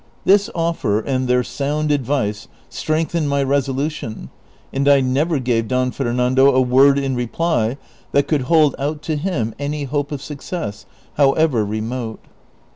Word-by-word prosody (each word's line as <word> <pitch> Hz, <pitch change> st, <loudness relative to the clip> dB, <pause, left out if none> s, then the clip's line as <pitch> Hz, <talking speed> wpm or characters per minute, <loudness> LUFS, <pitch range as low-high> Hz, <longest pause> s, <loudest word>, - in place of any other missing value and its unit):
This 200 Hz, +1 st, +4 dB
otter, 165 Hz, -11 st, 0 dB
and 130 Hz, +2 st, -2 dB
their 125 Hz, 0 st, +2 dB
sound 150 Hz, +4 st, -2 dB
advice, 130 Hz, -7 st, -1 dB, 0.2 s
strengthened 155 Hz, 0 st, -1 dB
my 140 Hz, 0 st, +1 dB
resolution, 135 Hz, -3 st, -2 dB, 0.4 s
and 140 Hz, +1 st, 0 dB
I 140 Hz, -1 st, +6 dB
never 140 Hz, +5 st, +1 dB
gave 120 Hz, -3 st, 0 dB
Don 125 Hz, +1 st, 0 dB
Fernando 130 Hz, +2 st, +2 dB
a -, -, +5 dB
word 135 Hz, +2 st, +5 dB
in 135 Hz, -1 st, -1 dB
reply 125 Hz, 0 st, -1 dB, 0.3 s
that 140 Hz, 0 st, +2 dB
could 150 Hz, -3 st, +1 dB
hold 155 Hz, -4 st, +5 dB
out 150 Hz, +2 st, -3 dB
to 160 Hz, -, -2 dB
him 145 Hz, -, -2 dB
any 145 Hz, +1 st, -3 dB
hope 145 Hz, +1 st, -2 dB
of 145 Hz, -, -3 dB
success, 140 Hz, -, -6 dB, 0.3 s
however 140 Hz, -4 st, +3 dB
remote. 110 Hz, +2 st, -4 dB
140 Hz, 145 wpm, -19 LUFS, 125-150 Hz, 0.4 s, I